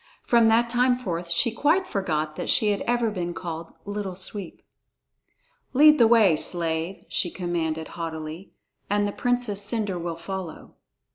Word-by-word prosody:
From 235 Hz, -2 st, +4 dB
that 230 Hz, +2 st, +4 dB
time 245 Hz, +1 st, +2 dB
forth 175 Hz, -8 st, -4 dB
she 170 Hz, +8 st, +2 dB
quite 310 Hz, +11 st, +2 dB
forgot 155 Hz, -, -2 dB
that -, -, -5 dB
she 210 Hz, -1 st, +3 dB
had 200 Hz, -, -2 dB
ever 240 Hz, -2 st, +1 dB
been 175 Hz, -4 st, -4 dB
called 165 Hz, -2 st, -6 dB
"Little 205 Hz, -2 st, -4 dB
Sweep." 190 Hz, 0 st, -5 dB, 1.1 s
"Lead 300 Hz, +2 st, +7 dB
the 230 Hz, -, +7 dB
way, 220 Hz, -7 st, +5 dB
slave," 165 Hz, +2 st, -1 dB
she 175 Hz, -, 0 dB
commanded 165 Hz, -3 st, -3 dB
haughtily, 160 Hz, +1 st, -6 dB, 0.4 s
"and 205 Hz, 0 st, +1 dB
the -, -, -2 dB
Princess 245 Hz, -3 st, 0 dB
Cendre 205 Hz, -3 st, -1 dB
will 170 Hz, -1 st, -4 dB
follow." 180 Hz, -1 st, -7 dB
195 Hz, 150 wpm, -25 LUFS, 170-230 Hz, 1.1 s, Lead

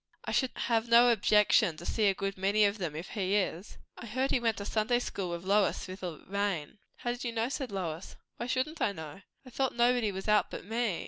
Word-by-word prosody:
I -, -, -3 dB
should 260 Hz, -, +2 dB
have 230 Hz, 0 st, 0 dB
no 240 Hz, +1 st, +7 dB
objection 210 Hz, -6 st, +3 dB
to 175 Hz, -, -9 dB
see 215 Hz, +2 st, +1 dB
a 195 Hz, -, +3 dB
good 195 Hz, 0 st, -3 dB
many 200 Hz, +3 st, +3 dB
of 205 Hz, +1 st, 0 dB
them, 165 Hz, -5 st, -3 dB
if 165 Hz, +4 st, -6 dB
he 195 Hz, -2 st, -1 dB
is." 190 Hz, -1 st, -2 dB, 0.2 s
"I -, -, -8 dB
heard 260 Hz, +5 st, -1 dB
he -, -, +3 dB
went 230 Hz, -3 st, 0 dB
to 200 Hz, -, -5 dB
Sunday 220 Hz, +4 st, +1 dB
School 195 Hz, -6 st, -3 dB
with 170 Hz, 0 st, -5 dB
Lois, 200 Hz, +2 st, +2 dB
through 185 Hz, 0 st, -7 dB
the 180 Hz, -5 st, -7 dB
rain." 200 Hz, -3 st, -2 dB, 0.2 s
"How 240 Hz, -, -2 dB
did 245 Hz, -, -5 dB
you 240 Hz, -, -2 dB
know?" 230 Hz, +1 st, -1 dB
said 270 Hz, -4 st, -4 dB
Lois. 175 Hz, -3 st, -5 dB, 0.2 s
"Why 240 Hz, -, -4 dB
shouldn't 260 Hz, +6 st, -2 dB
I 200 Hz, -, +2 dB
know?" 160 Hz, +2 st, -9 dB, 0.2 s
"I 255 Hz, -, -12 dB
thought 265 Hz, +1 st, -1 dB
nobody 240 Hz, -2 st, +3 dB
was 190 Hz, +1 st, -6 dB
out 210 Hz, 0 st, +3 dB
but -, -, -7 dB
me." 225 Hz, -4 st, -1 dB
210 Hz, 240 wpm, -30 LUFS, 190-235 Hz, 0.2 s, no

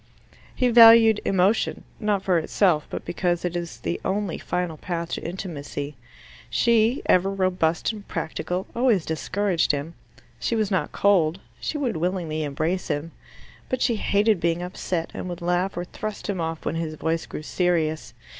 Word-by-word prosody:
He 250 Hz, -, +2 dB
valued 225 Hz, -2 st, +8 dB
emotion 195 Hz, +3 st, +2 dB, 0.2 s
not 205 Hz, -3 st, 0 dB
for 180 Hz, -3 st, +3 dB
itself, 160 Hz, -1 st, +1 dB
but -, -, -6 dB
because 175 Hz, 0 st, -1 dB
it 175 Hz, 0 st, -2 dB
is 170 Hz, -1 st, -4 dB
the 85 Hz, -1 st, -3 dB
only 195 Hz, -2 st, -1 dB
final 180 Hz, -3 st, -2 dB
path 170 Hz, +1 st, -4 dB
to -, -, -3 dB
intimacy. 150 Hz, -5 st, -5 dB, 0.5 s
She, 235 Hz, +2 st, +3 dB
ever 185 Hz, +2 st, +4 dB
robust 185 Hz, -3 st, +1 dB
and 210 Hz, -2 st, -10 dB
practical, 180 Hz, +4 st, -3 dB
always 235 Hz, -8 st, +2 dB
discouraged 175 Hz, +3 st, 0 dB
him. 145 Hz, +3 st, -4 dB, 0.5 s
She 125 Hz, -, -1 dB
was 215 Hz, -2 st, 0 dB
not 180 Hz, -6 st, 0 dB
cold; 185 Hz, -4 st, +3 dB, 0.2 s
she 305 Hz, -, -3 dB
would 255 Hz, -, -1 dB
willingly 170 Hz, -2 st, -1 dB
embrace 155 Hz, +5 st, -2 dB
him. 150 Hz, +3 st, -2 dB, 0.6 s
But 255 Hz, -1 st, 0 dB
she 235 Hz, -3 st, +2 dB
hated 205 Hz, -1 st, +2 dB
being 170 Hz, +1 st, 0 dB
upset, 180 Hz, -2 st, -3 dB
and 185 Hz, -, -5 dB
would 175 Hz, -1 st, -5 dB
laugh 180 Hz, +1 st, 0 dB
or 175 Hz, -, -2 dB
thrust 215 Hz, +3 st, -6 dB
him 195 Hz, -4 st, -2 dB
off 165 Hz, 0 st, -4 dB
when -, -, -1 dB
his 160 Hz, -1 st, -3 dB
voice 160 Hz, +1 st, -2 dB
grew 155 Hz, -, -7 dB
serious. 160 Hz, -7 st, 0 dB
180 Hz, 165 wpm, -24 LUFS, 160-200 Hz, 0.6 s, valued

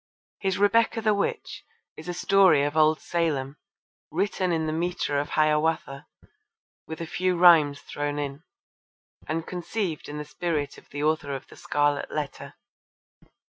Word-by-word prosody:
His 190 Hz, -1 st, -1 dB
Rebecca 225 Hz, +3 st, +3 dB
the 215 Hz, -1 st, +2 dB
Witch 200 Hz, -, -3 dB, 0.3 s
is -, -, -9 dB
a -, -, -2 dB
story 185 Hz, -5 st, +4 dB
of 145 Hz, +1 st, -2 dB
old 155 Hz, 0 st, +4 dB
Salem, 150 Hz, -5 st, -2 dB, 0.5 s
written 190 Hz, -3 st, -1 dB
in 160 Hz, -1 st, 0 dB
the 155 Hz, -, -2 dB
metre 170 Hz, -3 st, -1 dB
of 145 Hz, -, -3 dB
Hiawatha, 155 Hz, -2 st, 0 dB, 0.8 s
with 160 Hz, +1 st, -7 dB
a -, -, -3 dB
few 180 Hz, +2 st, -1 dB
rhymes 160 Hz, -5 st, +6 dB
thrown 145 Hz, 0 st, -4 dB
in, 140 Hz, 0 st, -4 dB, 0.9 s
and 160 Hz, +1 st, -2 dB
conceived 180 Hz, -2 st, -4 dB
in 150 Hz, -, -6 dB
the 150 Hz, -, -5 dB
spirit 150 Hz, -1 st, -3 dB
of -, -, -25 dB
the 145 Hz, +1 st, -4 dB
author 150 Hz, -2 st, 0 dB
of 135 Hz, -, -7 dB
The -, -, -13 dB
Scarlet 145 Hz, 0 st, 0 dB
Letter. 150 Hz, -2 st, -5 dB
155 Hz, 150 wpm, -26 LUFS, 145-180 Hz, 0.9 s, rhymes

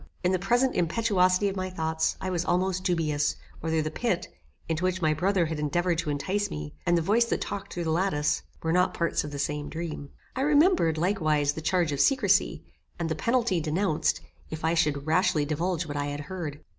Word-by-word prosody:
In 180 Hz, -, +2 dB
the 185 Hz, -, +1 dB
present 240 Hz, +7 st, +2 dB
impetuosity 185 Hz, +1 st, +2 dB
of 195 Hz, -, -2 dB
my 185 Hz, -1 st, -2 dB
thoughts, 160 Hz, -3 st, -1 dB
I 190 Hz, -, -3 dB
was 175 Hz, -2 st, 0 dB
almost 185 Hz, +1 st, 0 dB
dubious, 155 Hz, -5 st, +1 dB, 0.2 s
whether 160 Hz, -1 st, 0 dB
the 155 Hz, -, -3 dB
pit, 190 Hz, 0 st, -1 dB, 0.4 s
into 165 Hz, +1 st, -2 dB
which 185 Hz, 0 st, +1 dB
my 155 Hz, -3 st, +2 dB
brother 180 Hz, +3 st, +1 dB
had 160 Hz, -1 st, -3 dB
endeavoured 170 Hz, +3 st, 0 dB
to 165 Hz, -, -2 dB
entice 190 Hz, +8 st, -1 dB
me, 75 Hz, 0 st, -6 dB
and 175 Hz, -, +4 dB
the 165 Hz, -, 0 dB
voice 225 Hz, +7 st, +3 dB
that 230 Hz, -, -1 dB
talked 200 Hz, -1 st, -5 dB
through 175 Hz, -, -3 dB
the 160 Hz, -, -1 dB
lattice, 160 Hz, -4 st, +1 dB, 0.2 s
were 160 Hz, 0 st, +1 dB
not 180 Hz, +1 st, +2 dB
parts 170 Hz, -1 st, 0 dB
of 150 Hz, -, -5 dB
the 145 Hz, -, -6 dB
same 145 Hz, +1 st, -2 dB
dream. 160 Hz, -3 st, -5 dB, 0.3 s
I 260 Hz, -, -1 dB
remembered, 295 Hz, -, +4 dB
likewise, 155 Hz, -5 st, +1 dB
the 160 Hz, -, -6 dB
charge 175 Hz, -1 st, +1 dB
of 140 Hz, -, -3 dB
secrecy, 200 Hz, -, +3 dB, 0.3 s
and 170 Hz, -2 st, -2 dB
the 160 Hz, -, -1 dB
penalty 230 Hz, -1 st, +1 dB
denounced, 155 Hz, +2 st, 0 dB, 0.3 s
if 160 Hz, 0 st, -5 dB
I 165 Hz, -, +2 dB
should 150 Hz, -4 st, +1 dB
rashly 155 Hz, -2 st, +2 dB
divulge 170 Hz, +3 st, -1 dB
what 145 Hz, -1 st, -5 dB
I 145 Hz, 0 st, -1 dB
had 145 Hz, 0 st, -4 dB
heard. 155 Hz, -4 st, -6 dB
170 Hz, 205 wpm, -27 LUFS, 155-190 Hz, 0.4 s, and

